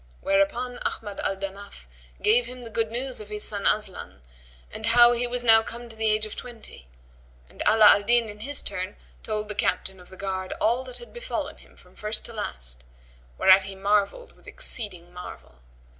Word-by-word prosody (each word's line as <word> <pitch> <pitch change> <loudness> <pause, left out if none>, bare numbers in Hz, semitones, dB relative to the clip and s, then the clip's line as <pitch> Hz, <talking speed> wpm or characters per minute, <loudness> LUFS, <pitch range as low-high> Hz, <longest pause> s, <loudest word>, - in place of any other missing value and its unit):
Whereupon 235 +6 0
Ahmad 205 -3 -4
al 195 - -1
Danaf 195 - -8 0.4
gave 235 +3 +4
him 250 0 -9
the 230 - -9
good 225 0 0
news 250 +1 -2
of 210 - -11
his 210 0 -1
son 205 -2 -1
Aslan 190 - -1 0.5
and 220 +1 -2
how 240 +1 +7
he 240 0 0
was 245 0 -2
now 225 -1 +7
come 235 +2 -8
to 225 - -10
the 220 0 +1
age 215 0 +2
of 215 - -6
twenty: 230 - -10 0.6
and - - -11
Ala 215 0 +6
al 205 - +8
Din, 235 +2 +2
in 210 0 -9
his 280 +6 -5
turn, 185 0 -3 0.3
told 215 -1 -2
the 210 - -3
Captain 190 -2 -1
of 180 - -15
the 190 - -13
Guard 190 -1 -3
all 235 +4 +2
that 250 -1 -8
had 240 -1 -13
befallen 485 +1 -4
him - - -20
from - - -20
first 215 +1 -3
to 235 - -10
last, 60 - -6 0.5
whereat 190 0 +7
he 195 0 -7
marvelled 205 - 0
with - - -23
exceeding 190 - -2
marvel. 180 - -10
215 Hz, 195 wpm, -26 LUFS, 195-240 Hz, 0.6 s, al